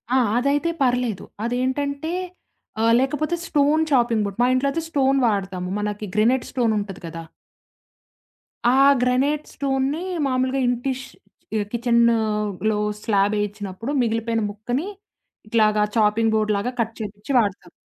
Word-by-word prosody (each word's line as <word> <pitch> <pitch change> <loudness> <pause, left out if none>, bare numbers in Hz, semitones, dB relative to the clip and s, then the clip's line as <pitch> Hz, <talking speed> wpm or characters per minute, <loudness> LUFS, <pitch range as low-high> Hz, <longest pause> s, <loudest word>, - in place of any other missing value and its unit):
ఆ! - - +5 0.2
అదైతే 280 +6 +1
పర్లేదు. 245 -6 +1 0.2
అదేంటంటే 280 +5 -1 0.7
ఆహ్, 230 0 +4
లేకపోతే 300 +5 0
స్టోన్ 295 +1 +3
చాపింగ్ 240 -5 +3
బోర్డ్, 200 -1 -5
మా 245 - +4
ఇంట్లో 255 +2 +1
అయితే, 330 - -2
స్టోన్ 275 -3 +2
వాడతాము. 190 -4 -2
మనకి 210 0 -3
గ్రానైట్ 240 +4 +3
స్టోన్ 235 -4 +1
ఉంటది 200 -2 -7
కదా! 165 0 -7 1.4
ఆ - - +6 0.3
గ్రానైట్ 270 +4 +1
స్టోన్‌ని 275 +3 -1 0.3
మామూలుగా 260 +1 0
ఇంటిష్ 255 +2 -2 0.5
ఆహ్, 205 - -1
కిచెన్‌లో 220 -3 +1 0.2
స్లాబ్ 205 -1 +2
వేయించినప్పుడు 205 +3 -4
మిగిలిపోయిన 225 -1 0
ముక్కని 245 - -3 0.6
ఇట్లాగా 215 -1 +3
చాపింగ్ 220 +1 +3
బోర్డ్‌లాగా 215 +2 0
కట్ 230 -1 0
చేయించి 210 +3 -6
వాడతాము. 200 -5 -2
235 Hz, 120 wpm, -22 LUFS, 210-265 Hz, 1.4 s, ఆ